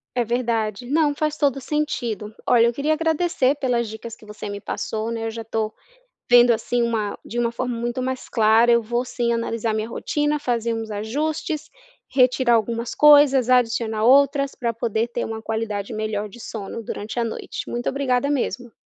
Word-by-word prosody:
É 245 - +2
verdade, 230 -1 -1
não 295 +1 +2
faz 305 0 -1
todo 280 -3 +2
o - - -6
sentido. 240 -8 -2
Olha, 235 -1 +5
eu 235 - +2
queria 285 +5 0
agradecer 320 -4 +1
pelas 245 -5 0
dicas 220 +1 -8
que - - -18
você 210 0 -8
me 200 0 -5
passou, 220 +2 -4
né, 225 -1 -3
eu - - -3
já 225 0 -6
estou 220 -1 -2 0.6
vendo 245 0 +7
assim 235 +2 0
uma 225 -3 -1
de 240 - -6
uma 235 -1 +1
forma 245 +1 -3
muito 240 +2 -2
mais 260 0 -4
clara 225 +1 +4
eu 235 0 +4
vou 240 +2 -1
sim 240 -2 -1
analisar 230 -1 -1
minha 215 +1 -2
rotina, 295 +5 -1
fazer 235 -4 -1
uns 225 -1 -4
ajustes, 300 +8 -3 0.4
retirar 255 -1 +3
algumas, 230 +1 -1
coisas 285 -4 +6
adicionar 230 -3 +2
outras, 275 +2 +4
para 235 -2 -2
poder 230 0 -1
ter 240 - -3
uma 225 0 -5
qualidade 220 -2 -3
melhor 215 -1 -3
de 220 - -13
sono 220 -1 -6
durante 220 +2 -5
a - - +2
noite, 225 - -6
muito 240 0 -2
obrigada 270 0 0
mesmo. 245 -3 -2
235 Hz, 185 wpm, -22 LUFS, 225-260 Hz, 0.6 s, vendo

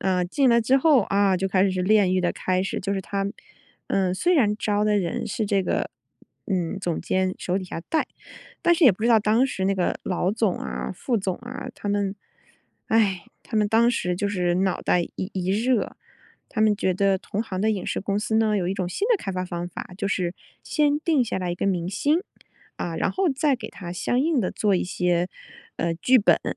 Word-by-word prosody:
呃， 185 -2 +1
进 265 +9 +2
来 235 -1 +5
之 255 +4 +3
后， 275 -1 +5
啊， 195 -1 +2
就 190 +1 -1
开 185 0 +3
始 195 - +2
是 185 0 -1
炼 195 -1 +4
狱 185 - +2
的 175 - 0
开 185 0 0
始， 190 - -3
就 195 +1 -2
是 195 - -1
他， 195 +1 -2 0.6
嗯， 185 -2 +1
虽 355 - +2
然 210 -8 +3
招 210 -1 0
的 210 -1 +3
人 170 -3 -2
是 220 - -2
这 200 -2 +1
个， - - -1 0.6
嗯， 185 -1 -1
总 175 -3 -2
监 185 +1 0
手 185 +1 -1
底 190 - -6
下 175 - -6
带。 320 - +1 0.6
但 345 -1 +5
是 335 -2 +3
也 240 - +8
不 200 - -9
知 235 - +3
道 230 -2 +6
当 220 +5 +3
时 190 -7 -3
那 195 +1 +2
个 180 -2 -1
老 180 0 0
总 215 -2 0
啊， 65 0 -4
副 245 - -1
总 190 -3 -2
啊， 245 +2 -7
他 205 - -6
们， 200 -1 0 0.7
哎， 200 -5 +2 0.2
他 220 - -5
们 210 - +3
当 230 +2 +4
时 180 -6 -1
就 200 +3 -1
是 180 -3 0
脑 190 0 0
袋 180 - +2
一 185 +3 -6
一 185 -1 -2
热， 230 +4 0 0.5
他 220 - -3
们 215 -1 +4
觉 190 -3 0
得 195 0 +2
同 205 +2 -3
行 185 -5 -5
的 220 +2 +2
影 195 -4 -3
视 - - -2
公 200 +1 -1
司 220 +1 -1
呢， 220 -1 +3
有 180 -2 -1
一 190 - -1
种 185 -3 -2
新 400 - -2
的 475 - +4
开 195 - -5
发 185 0 -2
方 175 -1 -4
法。 180 - -8
就 - - -1
是 180 -2 -1 0.3
先 295 -1 +1
定 310 -5 +2
下 235 - -3
来 180 -1 -2
一 175 - -1
个 - - -1
明 180 -3 0
星， 290 - +1 0.6
啊， - - -4
然 - - 0
后 385 -1 +1
再 275 -1 +1
给 220 -3 -7
他 175 -3 -8
相 245 +7 0
应 305 -3 +2
地 185 - -1
做 205 -3 +2
一 - - -1
些， 180 -1 0 0.5
呃， 170 - 0
剧 250 +10 +4
本。 205 - +4
就 - - -1
是 - - -22
200 Hz, 255 characters per minute, -24 LUFS, 185-225 Hz, 0.7 s, 也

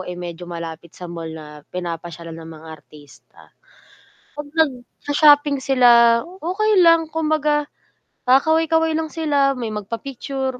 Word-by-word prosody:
ay 180 - -6
medyo 175 0 -8
malapit 165 -1 -8
sa 180 - -8
mall 165 -1 -7
na 150 -2 -11
pinapasyalan 170 -2 -6
ng 160 - -10
mga 160 - -14
artista. 150 -1 -19 0.9
'Pag 295 0 -7
nagsha-shopping 290 0 +2
sila, 235 -3 +5 0.2
okey 400 +3 +2
lang 330 -1 +5
kumbaga, 305 -2 0 0.6
kakaway-kaway 320 +4 +3
lang 320 0 -2
sila, 285 -4 +1
may 230 -3 -4
magpa-picture, 260 +5 -5
260 Hz, 120 wpm, -20 LUFS, -, 0.9 s, sila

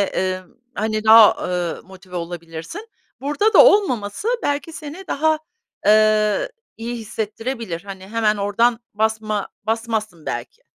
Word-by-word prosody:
emm, 185 -1 -1 0.3
hani, 215 +1 -2
daha, 220 -1 +9
ııı, 180 -2 -2
motive 185 -1 -11
olabilirsin. 170 - -7 0.3
Burada 295 +11 +1
da - - +9
olmaması 370 - +2
belki 290 +3 -2
seni 320 +3 -8
daha, 315 0 +1 0.5
eee, 215 -1 +4 0.3
iyi 235 +1 -5
hissettirebilir. 220 -3 -5
Hani, 190 -1 -9
hemen 215 -1 +1
oradan 230 +4 +1
basma 215 -1 -1 0.2
basmazsın 220 -6 -2
belki. 120 +1 -5
215 Hz, 115 wpm, -21 LUFS, 190-240 Hz, 0.5 s, daha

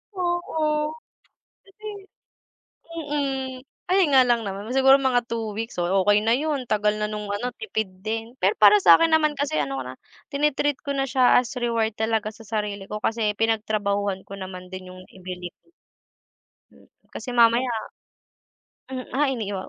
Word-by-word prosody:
Oo, 320 -4 -1 0.7
kasi 425 +2 -12 1.0
mm 280 -5 -3 0.3
ayun 370 -3 +3
nga 265 -1 +7
lang 240 -1 +3
naman 200 +1 -5
siguro 270 0 +7
mga 255 -3 +2
2 225 -2 -3
weeks 225 -3 -5
oh 185 +2 +2
okey 205 +1 +4
na 225 +1 +3
yun 285 -2 -2
tagal 210 -1 +2
na 210 - 0
nung 210 -1 -5
ano 240 +4 -3
tipid 220 -1 -3 0.2
din. 225 +2 -4
Pero 195 +3 +3
para 205 -1 +7
sakin 250 - +6
naman 305 -1 +3
kasi 285 - -1
ano 135 -2 -3
ko - - -4
na 130 - -8 0.4
tini-treat 290 0 +1
ko 280 - -3
na 270 - +1
siya 255 -1 +4
as 245 0 -4
reward 230 -3 0
talaga 220 -1 0
sa 225 - -13
sarili 210 -2 -3
ko 210 - -4
kasi 220 -1 0
pinagtrabahuhan 205 -3 0
ko - - -9
naman 185 -1 -8
din 185 -1 -8
yung 185 0 -11
ibili. 180 -1 -8 1.2
Mm, - - -21 0.2
kasi 245 -2 -6
mamaya 235 +2 +5 1.2
mm, 260 -1 -7
ah, 285 +2 +2
iniiwa 205 -7 -3
225 Hz, 160 wpm, -24 LUFS, 205-270 Hz, 1.2 s, nga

